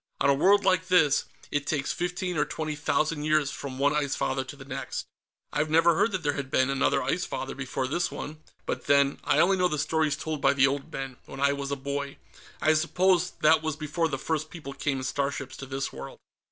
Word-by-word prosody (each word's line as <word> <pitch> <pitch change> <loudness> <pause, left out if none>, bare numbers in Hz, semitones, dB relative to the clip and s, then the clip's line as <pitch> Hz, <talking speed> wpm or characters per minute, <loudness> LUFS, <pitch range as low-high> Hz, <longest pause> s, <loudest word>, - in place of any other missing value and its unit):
On 140 - +4
a - - +5
world 195 +8 +4
like 185 -2 +2
this, 160 -6 +4 0.3
it 145 -1 -1
takes 145 -3 0
fifteen 180 +1 -2
or 150 - +3
twenty 155 -1 -4
thousand 150 +1 0
years 155 -2 +2
from 135 -2 -6
one 140 +2 +2
Ice 145 -2 0
Father 130 0 -1
to 130 - -9
the 135 -1 -12
next." - - -5 0.5
"I 145 - +2
never 165 +2 +4
heard 205 +8 +2
that 185 -3 -2
there 145 -1 +1
had 140 -2 -4
been 130 0 +2
another 135 - +2
Ice 180 - 0
Father, 135 - -4
before 130 -1 -3
this 175 +6 0
one. 155 +1 -7 0.3
But - - -3
then, 140 0 +4
I 145 - +2
only 190 +5 +4
know 180 -1 +3
the 150 - -2
stories 155 0 +1
told 155 0 -4
by - - +4
the 135 -1 +4
old 135 0 -2
men, 135 -2 -5
when 135 - -9
I 140 0 +3
was 140 -1 -4
a 140 - -1
boy. 140 +1 -4 0.5
I 155 - +5
suppose 175 +3 +2
that 155 +1 +5
was 155 -2 -2
before 155 +2 -1
the 140 -3 -3
first 155 +2 -2
people 150 -4 -8
came 140 -1 -1
in 130 - -4
starships 135 0 -2
to 135 - -8
this 135 0 -3
world." 65 +1 -8
145 Hz, 230 wpm, -27 LUFS, 140-160 Hz, 0.5 s, a